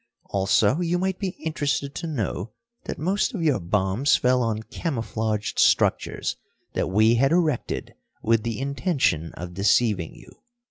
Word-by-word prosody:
Also 100 - +3
you 175 0 +1
might 190 +1 -1
be 195 - -1 0.2
interested 145 -3 -1
to 160 +3 -5
know 110 - -3 0.4
that - - -4
most 195 - 0
of 175 - -2
your 145 -8 +2
bombs 95 +9 +2
fell 125 0 +2
on 110 -2 -1
camouflaged 110 - -3
structures - - +2 0.4
that - - -1
we 110 +4 +4
had 135 +4 +3
erected 165 -7 0 0.3
with 115 0 +3
the 115 0 -3
intention 135 - 0
of 90 +1 -7
deceiving 100 -2 +2
you." - - -17
120 Hz, 145 wpm, -24 LUFS, 105-155 Hz, 0.4 s, we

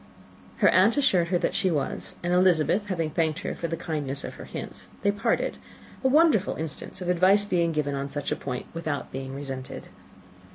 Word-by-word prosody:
Her - - +5
aunt 200 +8 +4
assured 185 -11 +3
her 175 +1 +2
that - - -1
she 195 -2 +2
was; 150 -5 -2
and 175 +1 0
Elizabeth, 180 +2 +3
having 165 -5 -1
thanked 160 +2 0
her - - -3
for 170 - -4
the 165 0 -3
kindness 150 -5 -3
of - - -6
her - - -10
hints, - - -6 0.2
they 200 - +4
parted, 225 +3 -1 0.4
a - - +4
wonderful 285 - +4
instance 160 +3 -6
of 180 - -4
advice 185 +3 +4
being 170 -4 +1
given 150 -2 -1
on 140 0 -3
such 145 0 -4
a - - +2
point 125 -3 -5
without 160 -3 -3
being 135 0 -5
resented. 135 -2 -6
170 Hz, 195 wpm, -26 LUFS, 145-190 Hz, 0.4 s, Her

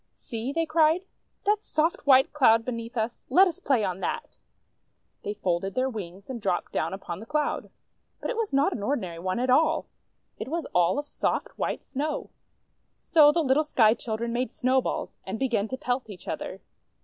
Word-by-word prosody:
"See," 230 +3 -5
they 330 +2 0
cried, 320 +3 +3 0.4
"that 420 +1 +2
soft, 310 0 0
white 265 -1 +6
Cloud 230 -6 +5
beneath 230 -1 -5
us! 225 +2 -2
Let 370 +9 +6
us 335 - -4
play 255 -6 +2
on 185 -2 -2
that! - - -4 0.4
" - - -47
They 205 - -3
folded 185 0 -1
their 260 +1 +1
wings, 195 -3 -8
and 250 -3 -6
dropped 185 -3 -1
down 160 - -1
upon 190 -3 -6
the 220 - -10
Cloud. 300 -1 -1 0.5
But - - -3
it - - -3
was 450 -2 -1
not 280 +7 +3
an 215 - -5
ordinary 195 -8 -2
one 185 +3 -2
at 250 +1 +1
all; 320 +4 +3 0.5
it - - -4
was 330 +4 -2
all 175 +8 +3
of 290 - -2
soft, - - -1
white - - -2
Snow. 295 +3 -3 0.7
So 300 -3 +6
the 330 +2 +1
little 275 +2 +3
Sky 225 -7 +4
Children 230 0 -3
made 245 -1 -1
Snowballs, 255 0 0
and 190 +3 -4
began 235 -5 0
to 260 - -4
pelt 250 -2 -2
each 195 -3 -11
other. - - -5
255 Hz, 190 wpm, -27 LUFS, 215-300 Hz, 0.7 s, white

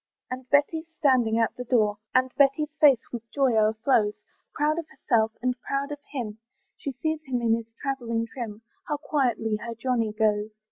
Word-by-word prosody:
And 255 0 -6
Betty's 315 +3 +2
standing 245 -6 +3
at 225 -1 +1
the 250 - -4
door, 215 -4 +2 0.2
And 255 0 +3
Betty's 285 +2 +3
face 280 -6 +5
with 240 - -4
joy 270 -3 +2
o'erflows, 220 0 +3 0.4
Proud 305 +2 +1
of 330 - -6
herself, 225 -4 +1
and 255 0 +2
proud 275 +1 -2
of 290 - -5
him, 225 -6 -4 0.4
She 280 - -5
sees 315 +4 -2
him 255 -2 -1
in 230 -1 +2
his 230 0 -3
travelling 235 -5 -2
trim; 225 -2 -7 0.2
How 295 - -1
quietly 245 -7 0
her 230 +2 -6
Johnny 230 -2 0
goes. 210 -1 +1
250 Hz, 175 wpm, -26 LUFS, 225-275 Hz, 0.4 s, face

